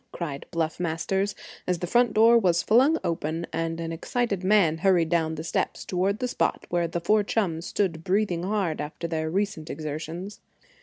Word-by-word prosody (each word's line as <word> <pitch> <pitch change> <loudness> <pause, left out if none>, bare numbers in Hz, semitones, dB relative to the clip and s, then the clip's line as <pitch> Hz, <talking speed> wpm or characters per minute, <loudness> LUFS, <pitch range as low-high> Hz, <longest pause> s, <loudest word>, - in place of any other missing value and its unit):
cried 150 -5 -5
Bluff 165 -1 -2
Masters, 190 +4 -1 0.3
as 180 -1 +1
the 175 - -3
front 240 +5 +3
door 225 +2 +7
was 180 -7 +3
flung 265 +9 +4
open 165 0 -2
and 165 0 -2
an 165 0 -3
excited 200 +3 -2
man 185 -5 +3
hurried 175 -3 +3
down 160 -1 +1
the 155 - -5
steps 165 - -2
toward 190 +3 0
the 250 - -2
spot - - -1
where 175 -1 +1
the 175 +1 -3
four 210 +5 +3
chums 185 -6 -1
stood 170 -6 -1
breathing 185 -2 +1
hard 185 -5 -1
after 155 +3 -5
their 160 -1 -2
recent 195 -3 -2
exertions. 160 +6 -5
175 Hz, 175 wpm, -26 LUFS, 165-205 Hz, 0.3 s, door